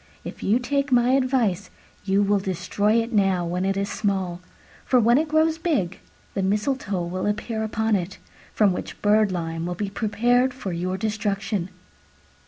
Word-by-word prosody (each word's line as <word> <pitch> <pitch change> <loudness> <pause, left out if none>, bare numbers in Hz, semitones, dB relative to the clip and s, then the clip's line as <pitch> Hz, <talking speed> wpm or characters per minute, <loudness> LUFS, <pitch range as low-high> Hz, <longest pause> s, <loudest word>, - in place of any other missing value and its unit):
If - - -8
you 210 +4 +3
take 280 +2 -1
my 245 0 +4
advice, 255 -8 +1 0.4
you 195 +1 +2
will 200 0 +2
destroy 195 +3 0
it 230 +1 -8
now 195 -4 +2
when 180 +2 -2
it 195 0 0
is 200 0 -1
small: 190 -4 -2 0.4
for 255 - +3
when 235 +3 +4
it 315 - 0
grows 315 +1 +2
big, 220 - -1 0.3
the 195 - -1
mistletoe 205 -1 -1
will 185 +3 -3
appear 220 +2 -2
upon 220 0 0
it, 190 0 -3 0.3
from 205 -4 +3
which - - -6
birdlime 180 -6 +1
will 175 - -3
be 200 +2 -3
prepared 240 +5 +1
for 200 -9 -5
your 180 +2 -2
destruction." 210 -3 -2
205 Hz, 165 wpm, -24 LUFS, 190-240 Hz, 0.4 s, my